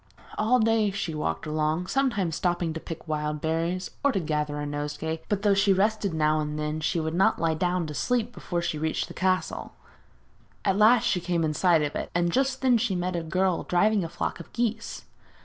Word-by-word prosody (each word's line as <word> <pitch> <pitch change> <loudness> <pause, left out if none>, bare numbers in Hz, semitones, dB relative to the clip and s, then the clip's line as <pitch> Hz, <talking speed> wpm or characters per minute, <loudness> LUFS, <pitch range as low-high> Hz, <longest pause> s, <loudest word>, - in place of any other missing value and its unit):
All 220 +4 +3
day 220 -2 +3
she 195 -4 -3
walked 150 +1 -2
along, 155 +3 0
sometimes 200 - 0
stopping 175 -2 0
to 160 - -4
pick 165 0 -8
the 160 - -5
wild 150 0 -1
berries, 165 +4 -1
or 280 - +4
to 195 - 0
gather 150 -2 -2
a 145 - -3
nosegay; 150 +2 -3
but 205 -1 -1
though 205 -1 +4
she 200 0 +4
rested 205 +1 +1
now 155 -1 +2
and 150 0 -3
then, 150 +1 -2
she 165 +3 0
would 160 0 -2
not 185 +3 +3
lie 165 -1 +1
down 180 +2 0
to 150 - -6
sleep 240 - 0
before 175 -6 -3
she 160 -3 -2
reached 160 0 -1
the - - -8
castle. 185 0 -1 0.9
At 195 -2 +3
last 220 +2 +6
she 180 - +1
came 170 -1 0
in 155 -1 0
sight 170 -1 +3
of 145 - -3
it, - - -3
and 175 0 +2
just 265 +2 0
then 250 -3 +4
she 220 -4 0
met 180 0 -2
a 170 - -1
girl 185 +2 0
driving 205 +3 +2
a 165 - -4
flock - - -3
of 170 - -11
geese. 230 -1 -2
175 Hz, 220 wpm, -26 LUFS, 155-205 Hz, 0.9 s, last